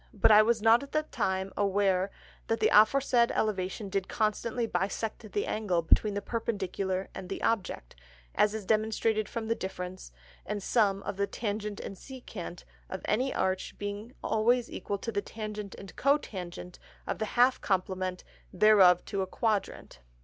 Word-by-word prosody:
But 205 - +5
I 210 0 +9
was 225 0 +1
not 230 +1 +6
at 280 - -10
that 305 0 -1
time 190 0 -1
aware 195 -1 +2 0.4
that 225 - 0
the - - +3
aforesaid 235 +2 +5
Elevation 200 -1 -1
did 195 -1 -2
constantly 225 +2 -1
bisect 210 +2 -3
the 205 - -1
Angle 185 -6 0
between 205 +5 +3
the 205 - -3
Perpendicular 195 -4 -2
and 185 - -8
the - - -4
Object, 195 - -1 0.4
as 210 +1 +2
is 215 -3 -5
demonstrated 215 0 +1
from 230 -2 -4
the 230 - +2
Difference 185 -2 -6 0.3
and 205 -1 -4
Sum 200 -4 +2
of 190 - -4
the 200 0 +1
Tangent 210 -1 -4
and 195 - -6
Secant 205 -7 -9 0.3
of 190 - -6
any 255 +5 +1
Arch 190 0 -1
being 205 +4 -6
always 235 +3 +2
equal 200 - -3
to 230 +4 -4
the 205 -2 -1
Tangent 210 -2 -6
and 195 -2 -11
Cotangent 185 -11 -1 0.3
of - - -3
the 215 - 0
half 250 +1 +5
Complement 185 -1 -1 0.3
thereof 190 -3 +6
to 200 -2 -2
a 190 - -2
Quadrant. 210 - -2
205 Hz, 165 wpm, -29 LUFS, 190-225 Hz, 0.4 s, I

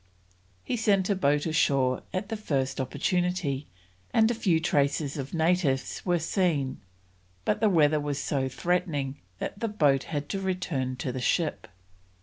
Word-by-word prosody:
He 245 - -2
sent 205 -3 +2
a - - +3
boat 145 -5 +2
ashore 140 -5 +2
at 190 +3 -3
the 225 - -2
first 140 -11 -1
opportunity, 175 0 -1 0.4
and 225 0 +4
a - - +1
few 190 -8 +2
traces 145 -2 +1
of 140 +1 -5
natives 160 -5 +1
were 175 -2 +2
seen, 165 -6 0 0.6
but - - +1
the 215 0 +4
weather 155 -4 +4
was 145 -1 -2
so 135 -2 -1
threatening 145 -2 -1 0.2
that 200 - -5
the 230 - -1
boat 145 -10 +2
had 145 -2 -3
to 195 - -2
return 175 -9 -2
to 125 +1 -3
the 130 +1 -4
ship. 160 +5 0
155 Hz, 155 wpm, -28 LUFS, 140-185 Hz, 0.6 s, and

